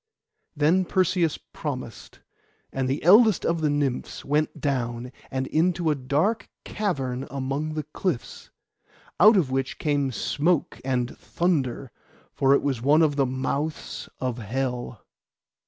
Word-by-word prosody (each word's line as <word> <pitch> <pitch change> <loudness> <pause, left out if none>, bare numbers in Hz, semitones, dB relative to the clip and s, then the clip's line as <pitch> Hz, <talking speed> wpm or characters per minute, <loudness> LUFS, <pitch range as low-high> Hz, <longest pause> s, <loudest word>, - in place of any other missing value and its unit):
Then 160 +6 +3
Perseus 180 -3 +1
promised, 130 -7 -7 0.5
and 130 -1 -1
the 135 - -2
eldest 210 +4 +6
of 165 -1 0
the 155 - +2
Nymphs 145 -3 -2
went 150 +2 0
down, 125 -3 -2 0.2
and 130 0 -2
into 165 +2 +1
a - - +1
dark 150 - 0
cavern 135 -11 -2
among 140 +3 -3
the 155 - -2
cliffs, 150 -2 -4 0.7
out 215 0 +8
of 150 -9 +1
which 130 0 -1
came 145 -3 0
smoke 150 - 0
and 125 -2 -1
thunder, 140 -8 -1 0.4
for 135 0 +4
it - - 0
was 135 -5 -1
one 150 +5 +5
of 150 -2 +2
the 135 -2 +2
mouths 140 +4 -3
of 125 -2 -2
Hell. 125 0 -4
140 Hz, 135 wpm, -25 LUFS, 130-160 Hz, 0.7 s, out